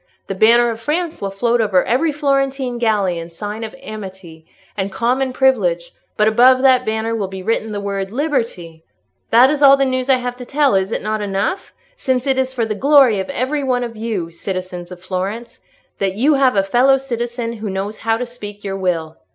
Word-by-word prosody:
The - - -4
banner 235 +4 +4
of 225 0 -7
France 320 +5 -2
will 200 - -2
float 235 +4 0
over 200 -4 +2
every 290 +7 +1
Florentine 275 -3 -1
galley 205 -7 +1
in 165 0 -8
sign 210 +6 -6
of 220 +3 -7
amity 190 -8 -9 0.3
and 195 -1 -3
common 250 +6 0
privilege, 195 -11 +1 0.3
but 210 - +3
above 255 +4 +5
that 255 -2 +4
banner 220 +1 -1
will 205 -3 -2
be 190 0 -8
written 220 +1 -1
the 205 - -3
word 200 -1 -3
'Liberty!' 230 - -3 0.5
"That 250 +4 +6
is 295 -1 -2
all 275 -1 +8
the 275 - +2
news 255 0 -2
I 265 - +6
have 245 -1 -4
to 250 - -8
tell; 285 +1 +2
is 190 +1 +1
it - - -3
not 215 0 -2
enough?—since 260 - -3
it 265 -1 +1
is 260 0 0
for 240 -3 -1
the 220 - -2
glory 265 -2 +4
of 190 - -4
every 280 +2 -1
one 250 -2 0
of 235 -1 -6
you, 215 -7 -4
citizens 180 0 -6
of 180 - -9
Florence, 195 +5 -4 0.4
that 195 -1 -1
you 275 +8 +3
have 270 -4 +3
a 195 - +3
fellow 250 +7 +3
citizen 240 -2 -4
who 215 -1 -5
knows 195 +3 -4
how 225 0 0
to 250 - -3
speak 205 -4 -10
your 195 -1 -4
will." 165 -4 -2
225 Hz, 205 wpm, -18 LUFS, 195-260 Hz, 0.5 s, all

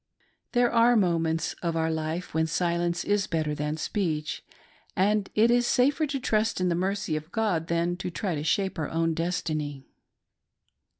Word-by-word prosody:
There 245 -1 +3
are 235 +1 +5
moments 165 -5 +1
of 170 -2 -1
our 160 0 +1
life 160 +2 -3
when 160 0 +1
silence 170 +1 0
is 205 -1 +1
better 155 -3 -1
than 150 +1 -2
speech, 160 -4 -2 0.5
and 205 +2 +2
it 225 +2 +5
is 240 0 +3
safer 280 +4 +2
to 280 -1 -2
trust, 220 -3 0
in 185 0 +1
the - - +2
mercy 190 -1 -1
of 155 +2 -6
'God 200 -8 0
than 170 +1 0
try 185 +1 -3
to 150 -1 -3
shape 190 +2 0
our 155 - -2
own 165 0 0
destiny. 155 -5 -2
175 Hz, 165 wpm, -27 LUFS, 160-210 Hz, 0.5 s, are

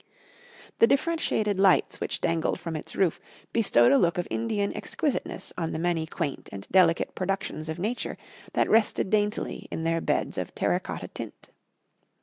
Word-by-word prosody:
The 230 - +7
different 330 +5 +1
shaded 210 -3 0
lights 195 -1 +3
which - - -2
dangled 165 -1 0
from 165 -2 -5
its 155 - -6
roof 185 -4 +1 0.3
bestowed 120 - +5
a 140 - +6
look 170 0 +2
of 175 - -1
Indian 215 -3 -1
exquisiteness 290 -5 -2
on 165 -1 -2
the - - -2
many 165 -1 0
quaint 150 -3 -4
and 100 0 -8
delicate 175 -3 +4
productions 185 -4 -3
of 160 - -3
nature 215 +7 -2 0.4
that - - +2
rested 215 -3 +2
daintily 210 0 0
in 160 - -4
their 165 0 +1
beds - - 0
of - - -5
terra - - +1
cotta - - -6
tint. - - -9
180 Hz, 165 wpm, -27 LUFS, 165-210 Hz, 0.4 s, The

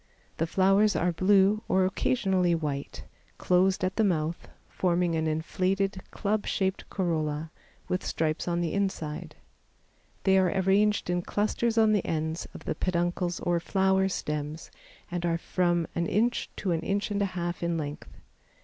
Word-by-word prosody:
The 165 - 0
flowers 195 +4 +3
are 175 +2 +2
blue 195 +4 +4
or 185 0 +3
occasionally 190 -3 +1
white, 140 - -4 0.3
closed 185 +1 +2
at 185 0 -1
the 220 - +4
mouth, 165 -4 -1 0.2
forming 175 -1 0
an 160 0 0
inflated, 185 +5 -1
club 210 0 -1
shaped 190 -1 -1
corolla, 155 -4 -2 0.4
with 185 - -1
stripes 155 +1 -1
on 175 0 0
the 170 - -1
inside. 190 -7 -3 0.9
They 190 -1 +5
are 185 -1 +3
arranged 195 +1 +2
in 175 0 0
clusters 220 +5 -1
on 220 -1 +5
the 205 -3 +2
ends 160 +1 -2
of - - -10
the - - -1
peduncles 175 +1 -1
or 175 -1 +1
flower 190 +2 +2
stems 150 -2 -4 0.4
and 175 0 -3
are 170 -1 +1
from 175 -1 0
an 170 0 -1
inch 235 +7 +1
to 190 - -2
an 165 - +1
inch 200 +5 -1
and 205 0 0
a - - +3
half 175 0 -3
in 170 -1 0
length. 145 -2 -5
180 Hz, 160 wpm, -28 LUFS, 165-195 Hz, 0.9 s, They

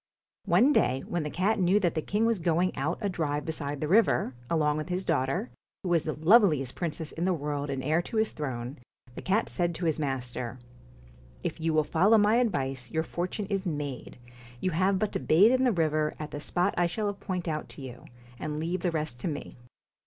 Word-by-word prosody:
One 275 +5 +5
day 130 - +2
when 175 - -1
the 150 - -3
cat 195 +7 +1
knew 185 +3 +4
that 175 -5 +1
the 155 - -1
king 210 +7 0
was 230 -3 +2
going 170 +2 +1
out 150 +6 -1
a 205 - 0
drive 150 -6 -2
beside 145 -3 -3
the 155 - -2
river, 195 - +3 0.2
along 150 -2 +2
with 155 +3 -4
his 180 +1 -2
daughter, 135 -5 0 0.3
who 185 - -2
was 170 -2 +2
the 155 - -1
loveliest 160 - +4
princess 160 -2 -4
in 170 - -3
the 185 -1 +2
world 145 -1 -3
and 135 -1 -3
heir 155 +5 +2
to 220 - -5
his 220 0 +2
throne, 130 -2 -5 0.3
the - - -7
cat 205 +4 +1
said 175 -2 -1
to 175 - -3
his 160 -1 +1
master: 125 -4 -3 0.9
'If - - -3
you 165 0 +1
will 155 -1 +3
follow 190 +9 +4
my 210 +2 +4
advice, 135 - -1
your 160 +6 0
for 175 +2 -3
tune 205 +2 -4
is 195 -1 -2
made. 145 -7 -4 0.4
You 185 - 0
have 190 +4 +2
but 210 +2 -1
to - - -2
bathe 195 +9 +5
in 260 0 +3
the 250 - +4
river, 155 -4 +1
at 150 -1 -6
the 145 - -5
spot 175 +4 0
I 175 - +4
shall 205 +3 -2
point 185 -3 -4
out 155 -1 -3
to 140 - -10
you, 125 -2 -9 0.3
and 150 0 -3
leave 170 +3 -2
the 180 - +1
rest 155 -6 -3
to - - -3
me.' 150 -3 -5
165 Hz, 220 wpm, -28 LUFS, 145-185 Hz, 0.9 s, One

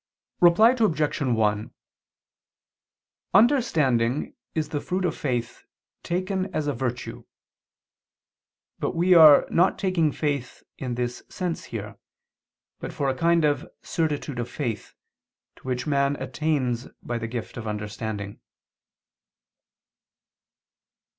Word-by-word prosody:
Reply 180 +7 +6
Obj. 170 - 0
1: 110 -5 +1 1.6
Understanding 150 - +3 0.2
is 155 -2 -1
the 145 -2 -3
fruit 185 +1 -2
of 165 - -1
faith, 120 -4 -3 0.3
taken 185 +2 -2
as 155 - 0
a 145 - 0
virtue. 120 -2 -4 1.5
But - - -2
we 180 +2 +4
are 155 -4 +8
not 180 +3 +3
taking 180 -6 +1
faith 140 -5 -3 0.2
in 125 -3 -3
this 120 0 -3
sense 180 -3 -4
here, - - -7 0.8
but - - -6
for 140 - -1
a 130 - -1
kind 165 +3 +3
of 145 -1 0
certitude 150 -5 -2
of 120 - -3
faith, 115 -8 -4 0.6
to - - -14
which 125 -1 -2
man 140 -1 +1
attains 130 -3 -1 0.2
by 120 -1 -3
the 115 - -4
gift 115 -4 -6
of 115 -2 -6
understanding. 105 -1 -5
140 Hz, 115 wpm, -25 LUFS, 120-165 Hz, 1.6 s, are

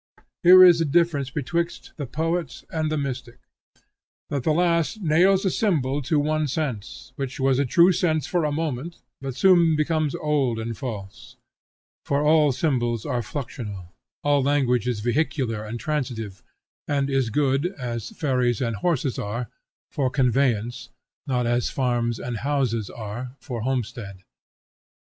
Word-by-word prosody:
Here 185 +1 +9
is 175 -2 +7
the 165 - +2
difference 150 -3 +1
betwixt 170 +5 -3
the 145 -4 -4
poet 160 -2 -2
and 155 -1 -1
the 155 - 0
mystic, 130 -4 -4 0.9
that 140 -2 -1
the 155 - +1
last 170 +4 +1
nails 185 +5 +4
a 190 - +2
symbol 145 - 0
to 150 +3 0
one 155 +1 +1
sense, 125 -5 -4
which 135 -1 -4
was 135 0 +2
a 140 - +2
true 170 +6 +5
sense 160 -5 +1
for 175 +1 0
a 150 - 0
moment, 155 +1 -3 0.3
but 135 -2 -5
soon 170 +1 +5
becomes 155 -1 0
old 140 -6 0
and 115 +1 -4
false. 105 -8 -7 0.7
For 140 +1 0
all 150 -1 +5
symbols 120 -5 -1
are 125 -4 -1
fluxional; 105 - -6 0.3
all 145 -1 +3
language 130 -4 +1
is 120 -4 -1
vehicular 120 -2 -1
and 110 +2 -6
transitive, 115 -8 -3 0.5
and 140 -1 0
is 135 -4 0
good, 135 +5 +1
as 125 - -5
ferries 125 -5 0
and 115 -4 -1
horses 140 - 0
are, 115 +3 -4 0.4
for 135 -2 0
conveyance, 125 -2 0 0.4
not 125 -3 0
as 120 0 +1
farms 120 -3 0
and 120 -1 -4
houses 125 -5 -1
are, 120 +4 -7
for 120 -4 -5
homestead. 115 -6 -4
135 Hz, 150 wpm, -24 LUFS, 120-155 Hz, 0.9 s, Here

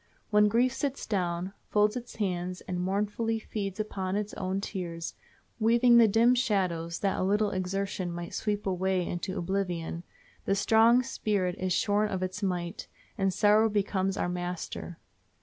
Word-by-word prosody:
When 210 0 +5
grief 240 +4 +2
sits 270 +1 -3
down, 180 -2 -2 0.2
folds 210 0 +3
its 245 -1 -7
hands, 180 -3 -2
and 180 -1 -4
mournfully 210 +4 -1
feeds 205 -2 -5
upon 190 -3 -2
its 210 0 -2
own 190 +1 -2
tears, 170 -4 -5 0.5
weaving 235 +2 +5
the 230 - +7
dim 230 +4 +4
shadows 185 -9 0
that 195 -1 0
a - - +1
little 205 +2 +2
exertion 190 0 -2
might 170 0 -6
sweep 210 -1 -2
away 190 -1 0
into 185 +3 -3
oblivion, 175 -2 -2 0.4
the 195 - +2
strong 225 +4 +5
spirit 205 -8 -1
is 185 0 -1
shorn 205 +3 +2
of 185 -1 -2
its 185 +3 -4
might, 175 -3 -3 0.3
and 195 -1 +1
sorrow 210 +4 +4
becomes 195 -2 0
our - - 0
master. 175 -1 -5
195 Hz, 155 wpm, -29 LUFS, 180-215 Hz, 0.5 s, the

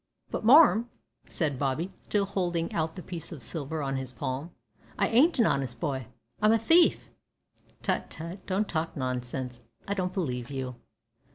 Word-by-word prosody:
"But, - - -3
marm," 240 -2 +7 0.4
said 145 -6 -1
Bobby, 150 +7 -1
still 205 -1 0
holding 175 -4 -1
out 160 0 -1
the 180 - -7
piece 170 -2 -6
of 155 -6 -8
silver 155 -1 -3
on 135 -1 -1
his 130 -1 -5
palm, 130 +5 -4 0.5
"I 200 - +3
ain't 290 +9 +5
a 230 - +5
honest 135 - 0
boy. 135 -7 -2 0.3
I'm 215 +1 +5
a - - +5
thief!" 330 +10 +4 0.7
"Tut, - - 0
tut, 170 +4 -8
don't 200 +2 0
talk 160 -1 -2
nonsense; 125 -1 -3 0.3
I 200 - 0
don't 185 -2 -1
believe 125 -11 -2
you." 130 -2 -4
165 Hz, 165 wpm, -28 LUFS, 130-200 Hz, 0.7 s, marm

